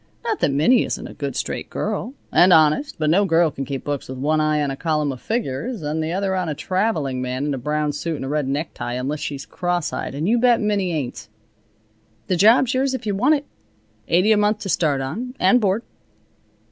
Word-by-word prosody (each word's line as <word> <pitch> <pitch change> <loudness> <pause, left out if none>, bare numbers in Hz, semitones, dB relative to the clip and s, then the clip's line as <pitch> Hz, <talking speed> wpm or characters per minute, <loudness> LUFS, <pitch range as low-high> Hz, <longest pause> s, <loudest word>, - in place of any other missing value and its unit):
Not 450 -3 -1
that - - +2
Minnie 155 - +4
isn't - - -4
a - - -10
good, - - -5
straight - - -3
girl, 260 - -3 0.2
and 180 +1 +5
honest, 160 - +4
but 155 -2 +1
no 195 +5 +4
girl 165 -3 +3
can 135 0 -5
keep 135 0 -5
books 145 -3 -4
with 130 - -6
one 155 +4 +1
eye 155 0 +1
on 140 - -1
a - - -4
column 150 -2 0
of 130 - -8
figures 220 - -3
and 150 +2 -2
the 160 +1 -2
other 190 +1 -1
on 180 -3 -1
a 150 - -2
traveling 160 - -1
man 130 +2 -2
in 145 - -1
a 135 - -3
brown 150 +3 -1
suit 165 +3 -3
and 135 - -5
a - - -4
red 145 -1 -1
necktie, 140 -3 -3
unless 135 +4 -3
she's 145 -2 -5
cross 175 -2 -2
eyed, - - -4
and 155 +5 -2
you 235 +3 +3
bet 245 -1 +4
Minnie 205 -4 0
ain't. 125 -8 -4 1.0
The 185 - 0
job's 230 +7 +5
yours 265 +1 +1
if 255 - -6
you 205 - 0
want 255 +10 +3
it. 285 0 -4 0.6
Eighty 185 +6 +3
a 215 - +5
month 210 +1 +2
to 200 - -4
start 150 -6 +1
on, 240 - -5
and 250 -1 +4
board." 205 +3 +1
160 Hz, 225 wpm, -22 LUFS, 145-210 Hz, 1.0 s, and